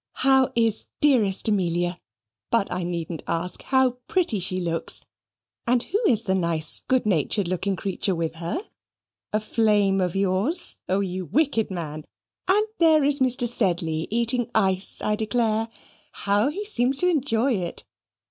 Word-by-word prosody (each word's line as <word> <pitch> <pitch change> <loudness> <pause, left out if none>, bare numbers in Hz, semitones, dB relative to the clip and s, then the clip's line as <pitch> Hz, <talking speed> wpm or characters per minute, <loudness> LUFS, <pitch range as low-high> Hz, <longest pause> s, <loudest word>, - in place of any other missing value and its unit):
"How 265 -1 +5
is 225 -2 +1
dearest 225 -11 +3
Amelia? 175 -3 0 0.5
But 230 -5 +1
I 180 +1 -2
needn't 170 -2 -4
ask: 175 +2 -2
how 260 -2 +1
pretty 340 - +1
she 185 0 -1
looks! 165 -2 -2 0.6
And 245 0 +2
who 410 +5 -1
is 225 -2 +4
that 190 - 0
nice 170 -4 -1
good 260 -2 0
natured 190 +1 +1
looking 185 +2 -1
creature 190 0 -1
with 165 -1 -2
her 170 - -3 0.7
a 215 - +1
flame 210 -3 +2
of 180 -1 -1
yours? 195 - +1
O, 190 +2 +2
you 185 -1 -3
wicked 270 - +1
men! 155 -5 -5 0.4
And 410 +3 +4
there 320 -3 +5
is 285 +1 +3
Mr. 250 -2 +2
Sedley 170 -8 0
eating 235 +1 +1
ice, 190 -3 +1
I 210 - +1
declare: 220 0 0 0.4
how 205 +5 +1
he 400 +8 -5
seems 270 - +1
to 360 - +3
enjoy 270 -6 +1
it! 180 -5 -4
210 Hz, 150 wpm, -24 LUFS, 180-250 Hz, 0.7 s, How